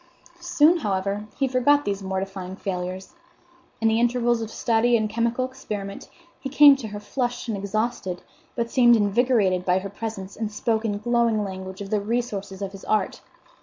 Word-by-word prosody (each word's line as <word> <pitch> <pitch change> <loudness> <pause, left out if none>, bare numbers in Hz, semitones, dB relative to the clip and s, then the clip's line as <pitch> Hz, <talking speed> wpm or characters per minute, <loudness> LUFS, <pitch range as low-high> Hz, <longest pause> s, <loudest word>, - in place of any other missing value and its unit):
Soon, 345 -1 +4
however, 200 - -2
he 275 - +1
forgot 275 +3 +3
these 200 0 -2
mortifying 190 -1 -4
failures. 185 - -5 0.7
In 225 - +2
the 225 +1 +3
intervals 240 -1 +2
of 225 - -4
study 235 +1 +2
and 215 -1 0
chemical 235 +3 0
experiment 210 -7 -7 0.3
he 270 - -5
came 285 +1 +8
to 245 -5 -6
her 205 -1 -6
flushed 245 +3 -3
and 225 - -1
exhausted, 200 -2 -3 0.3
but 235 -1 -2
seemed 240 -2 +6
invigorated 205 -3 +2
by 180 0 +2
her 190 +1 -4
presence, 200 -3 -6
and 220 -1 -3
spoke 220 +1 -1
in 205 -2 -1
glowing 230 -1 +1
language 190 0 -7
of 195 - -7
the 210 -1 +1
resources 205 -3 -3
of 195 - -4
his 195 -1 -11
art. 210 -3 0
215 Hz, 170 wpm, -24 LUFS, 195-240 Hz, 0.7 s, came